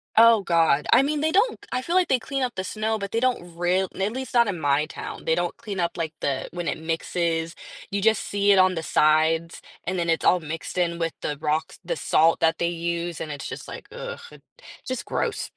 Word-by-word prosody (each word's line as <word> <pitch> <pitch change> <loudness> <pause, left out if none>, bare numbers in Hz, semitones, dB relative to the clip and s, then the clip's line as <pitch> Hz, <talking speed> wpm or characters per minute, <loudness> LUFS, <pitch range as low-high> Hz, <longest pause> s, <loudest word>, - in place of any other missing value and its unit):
Oh 230 -1 +7
god, 165 -5 +2
I 240 - +7
mean, 295 +1 -1
they 315 +1 +1
don't 410 +8 +2
I 255 - -1
feel 335 +7 -2
like 370 -1 +4
they 260 - +3
clean 275 +3 -3
up 245 -1 -2
the 190 - -2
snow, 220 +3 -1
but 200 -1 -5
they 225 - +1
don't 230 -9 -1
real 180 +2 +1
at 195 +2 0
least 260 0 -5
not 235 -2 +5
in 190 -4 -2
my 145 0 +2
town, - - -8
they 160 - +2
don't 175 0 -1
clean 210 -5 -6
up, 170 -1 -1
like, 165 -2 -3
the 135 -2 -1
when 175 -1 -4
it - - -1
mixes, 165 0 -1 0.4
you 200 0 -1
just 220 0 +3
see 205 0 +2
it 195 - +6
on 185 0 +5
the 165 - -2
sides, 160 +2 +2 0.2
and 185 +1 -2
then 170 -1 -1
it's 165 - +1
all 180 - +5
mixed 165 +2 -6
in 170 -1 +1
with 165 -1 -1
the 150 - -3
rocks 155 +1 -2
the - - -2
salt 165 - +3
that 165 0 +2
they 170 - +1
use, 170 0 -3
and 155 - -4
it's 145 -2 -6
just, - - -7
like, - - -9
ugh, 480 -1 -6
it - - -15 0.4
just 255 -1 -4
gross. 465 - -2
175 Hz, 240 wpm, -24 LUFS, 165-225 Hz, 0.4 s, Oh